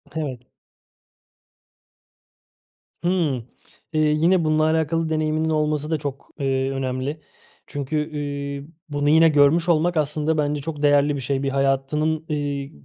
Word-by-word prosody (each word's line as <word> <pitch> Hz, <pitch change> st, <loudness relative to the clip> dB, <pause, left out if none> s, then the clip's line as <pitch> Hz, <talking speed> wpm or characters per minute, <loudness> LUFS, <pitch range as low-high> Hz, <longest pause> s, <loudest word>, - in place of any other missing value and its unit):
Evet. 145 Hz, -6 st, -3 dB, 2.6 s
Imm. 175 Hz, -5 st, +1 dB, 0.6 s
Eee, 155 Hz, -, +1 dB
yine, 160 Hz, +4 st, +3 dB
bununla 155 Hz, 0 st, +2 dB
alakalı 160 Hz, +1 st, +1 dB
deneyiminin 155 Hz, 0 st, 0 dB
olması 150 Hz, 0 st, 0 dB
da 160 Hz, -, +2 dB
çok, 140 Hz, -2 st, -6 dB
eee, 135 Hz, -1 st, 0 dB
önemli. 135 Hz, +3 st, -3 dB, 0.5 s
Çünkü, 150 Hz, +2 st, -2 dB
iii, 140 Hz, -1 st, -4 dB, 0.2 s
bunu 145 Hz, 0 st, 0 dB
yine 160 Hz, +1 st, +6 dB
görmüş 155 Hz, +4 st, +4 dB
olmak 170 Hz, +1 st, +2 dB
aslında 150 Hz, +1 st, 0 dB
bence 145 Hz, -1 st, 0 dB
çok 150 Hz, -1 st, -5 dB
değerli 145 Hz, 0 st, +4 dB
bir 135 Hz, -, -4 dB
şey. 135 Hz, +2 st, -1 dB
Bir 135 Hz, -, 0 dB
hayatının, 140 Hz, +4 st, 0 dB
eee, 145 Hz, -2 st, -2 dB
150 Hz, 125 wpm, -23 LUFS, 140-155 Hz, 2.6 s, yine